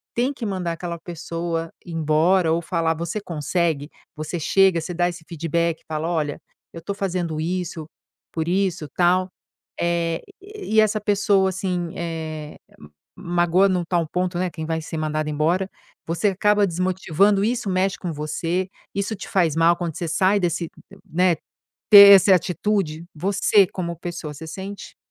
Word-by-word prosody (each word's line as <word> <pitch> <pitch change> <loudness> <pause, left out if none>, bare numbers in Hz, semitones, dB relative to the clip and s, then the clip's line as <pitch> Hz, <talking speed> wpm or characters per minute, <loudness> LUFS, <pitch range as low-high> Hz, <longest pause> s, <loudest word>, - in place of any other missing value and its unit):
tem 250 +4 +1
que 240 -4 -6
mandar 185 -4 -2
aquela 170 0 -5
pessoa 165 -1 -4
embora, 165 +2 +2
ou 170 - 0
falar. 165 -1 0
Você 170 +5 -3
consegue? 160 -3 -1 0.3
Você 155 +3 -4
chega, 190 +1 +3
você 175 - -5
dá 175 +1 +1
esse 170 -2 -9
feedback? 170 0 -1
Fala: 155 +1 -3
"Olha, 150 -4 -1 0.3
eu 165 - -7
estou 200 +5 -4
fazendo 175 -5 -2
isso 170 -2 -3 0.5
por 160 -1 -3
isso, 180 -3 0
tal?". 180 +1 +3 0.5
Eh, 170 -1 0 0.2
e 400 - -1
essa 215 -1 +1
pessoa, 200 -2 +2
assim, 180 -2 -3
eh, 160 -3 -5 0.6
magoa 175 +2 +2
em 185 - +1
um 175 - -1
tal 170 -3 0
ponto, 180 +1 -2
né, 185 0 0
quem 160 -2 -6
vai 160 0 -2
ser 160 - -6
mandado 155 0 -2
embora, 170 +6 0 0.4
você 170 +5 +1
acaba 205 +2 +3
desmotivando. 185 +2 +1
Isso 225 -2 -1
mexe 185 +1 +1
com 175 -4 -4
você? 165 +5 -2 0.3
Isso 200 +2 -2
te - - -9
faz 170 -6 +2
mal 165 +1 +4
quando 170 -3 -4
você 170 - -3
sai 185 +5 +2
desse, 170 -2 -1 0.4
né 180 +1 +3 0.6
ter 200 -1 +11
essa 195 0 +6
atitude? 180 -2 -1
Você, 195 +4 +3
como 170 -2 -4
pessoa, 170 -2 -6
você 160 +3 -9
sente? 195 +5 -8
175 Hz, 160 wpm, -22 LUFS, 165-190 Hz, 0.6 s, ter